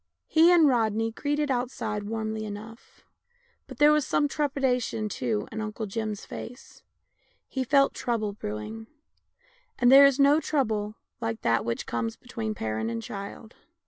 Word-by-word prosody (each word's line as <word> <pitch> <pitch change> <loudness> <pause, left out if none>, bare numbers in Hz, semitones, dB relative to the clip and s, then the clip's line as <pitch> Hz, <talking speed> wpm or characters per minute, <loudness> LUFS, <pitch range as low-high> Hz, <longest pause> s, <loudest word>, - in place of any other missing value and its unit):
He 330 +2 +5
and 335 -4 +6
Rodney 225 -3 +1
greeted 290 +4 -1
outside 235 -5 -2
warmly 220 0 -3
enough, 215 +3 -10 0.6
but - - -10
there 295 0 +6
was 300 -1 +3
some 290 +2 +1
trepidation 265 -6 -1
too 115 - -2
in 220 - -4
Uncle 215 +1 -4
Jim's 215 0 -4
face 250 +2 -10 0.3
— - - -41
he 265 - -2
felt 275 +1 +3
trouble 220 -4 -2
brewing; 200 - -6 0.9
and 245 0 +4
there 280 +1 +10
is 275 0 0
no 285 +2 +6
trouble 220 -9 -1 0.2
like 225 -1 -3
that 115 0 +2
which 115 0 -3
comes 115 -1 -3
between 225 -3 -5
parent 110 - -2
and 115 -1 -4
child. 200 +3 -8
225 Hz, 150 wpm, -27 LUFS, 210-270 Hz, 0.9 s, there